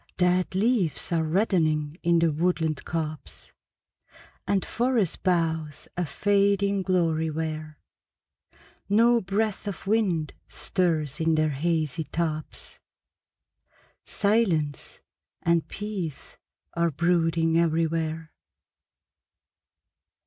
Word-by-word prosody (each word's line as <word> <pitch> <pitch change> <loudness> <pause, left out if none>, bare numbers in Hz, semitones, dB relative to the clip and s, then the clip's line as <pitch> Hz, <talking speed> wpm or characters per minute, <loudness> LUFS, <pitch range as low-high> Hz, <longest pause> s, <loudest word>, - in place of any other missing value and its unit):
Dead 180 0 +2
leaves 200 - +1
are 165 -1 +2
reddening 155 -4 +1
in 170 0 +3
the 165 -1 +3
woodland 160 -1 0
copse, 155 -2 -5 0.9
And 195 -2 +1
forest 235 -7 0
boughs 160 -4 -1
a 180 -2 -1
fading 200 +1 +2
glory 165 -4 +1
wear; 155 -1 -4 1.1
No 230 +3 +4
breath 205 +2 -1
of 200 - -5
wind 195 -7 +1
stirs 155 -6 -1
in 160 0 +2
their 155 -1 +2
hazy 155 0 -1
tops, 155 -1 -4 1.2
Silence 190 -9 0 0.4
and 170 -1 +2
peace 195 -8 -6 0.4
are 170 0 +1
brooding 165 +1 +2
everywhere. 160 -1 0
170 Hz, 90 wpm, -26 LUFS, 155-195 Hz, 1.2 s, No